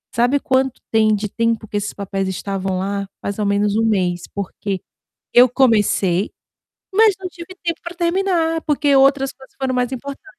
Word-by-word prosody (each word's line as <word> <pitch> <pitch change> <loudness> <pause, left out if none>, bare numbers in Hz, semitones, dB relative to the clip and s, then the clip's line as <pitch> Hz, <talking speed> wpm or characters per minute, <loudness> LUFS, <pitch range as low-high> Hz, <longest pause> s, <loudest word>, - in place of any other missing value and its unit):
Sabe 245 +5 +3
quanto 265 -3 0
tem 215 -1 +4
de 210 +1 -3
tempo 230 -1 -1
que 205 - -3
esses 205 - -2
papéis 195 -1 -3
estavam 190 0 -3
lá? 200 +1 -2 0.2
Mais 200 +1 -3
ou 210 - 0
menos 200 0 +1
1 225 - +2
mês 180 -5 +1
porque, 200 0 -4 0.6
eu 250 +1 +8
comecei, 210 -7 +2 0.6
mas 425 -1 +5
não 370 - -4
tive 355 +2 -11
tempo 335 -1 -2
para 345 0 -7
terminar 340 -2 +1
porque 290 -2 +2
outras 270 0 +4
coisas 265 0 -18
foram 260 -1 -1
mais 250 0 0
importante. 275 +7 -7
235 Hz, 175 wpm, -20 LUFS, 200-285 Hz, 0.6 s, eu